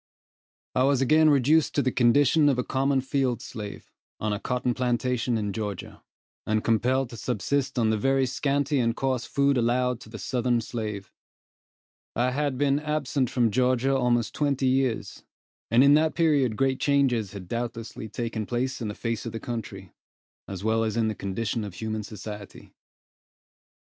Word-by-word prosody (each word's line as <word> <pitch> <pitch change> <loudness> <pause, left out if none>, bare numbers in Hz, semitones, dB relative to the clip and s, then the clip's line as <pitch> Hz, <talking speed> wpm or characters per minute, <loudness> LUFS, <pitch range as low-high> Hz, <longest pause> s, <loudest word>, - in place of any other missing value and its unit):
I 130 - +1
was 135 0 +3
again 155 +3 +5
reduced 145 +3 +3
to 145 - +2
the 130 - +1
condition 140 +5 +4
of 135 - +1
a 125 - 0
common 135 +1 +1
field 130 -3 0
slave, 105 -4 -8 0.3
on 105 -1 -1
a 105 - -3
cotton 125 +1 -1
plantation 125 -1 0
in 105 -2 -2
Georgia, 105 -3 -5 0.4
and 110 0 0
compelled 125 +3 +1
to 115 - -8
subsist 130 +5 -1
on 110 -2 +2
the 110 - 0
very 135 +3 +2
scanty 140 +2 0
and 115 -1 +1
coarse 130 -3 -1
food 140 -2 +2
allowed 125 +1 +1
to - - -13
the 110 - -8
southern 125 0 0
slave. 105 -4 -5 1.0
I 125 +2 +1
had 140 0 -1
been 140 +1 +2
absent 150 -4 -1
from 120 -3 +1
Georgia 130 +2 +2
almost 120 -3 +1
twenty 140 -2 0
years, 130 -3 0 0.5
and 120 +3 +5
in 140 +1 +6
that 155 +1 +3
period 145 -9 +2
great 135 -1 +1
changes 130 -8 +1
had 95 -3 -8
doubtlessly 115 0 -5
taken 115 -1 -4
place 125 +2 -2
in 115 - -2
the 105 - -5
face 115 -1 -3
of 115 - -6
the 115 - -4
country, 105 -6 -6 0.5
as 95 -1 -6
well 110 +1 +2
as 110 0 -2
in 110 -1 +2
the - - -2
condition 105 +3 -3
of 100 -4 -7
human 110 +3 -3
society. 105 -1 -9
125 Hz, 170 wpm, -26 LUFS, 110-135 Hz, 1.0 s, in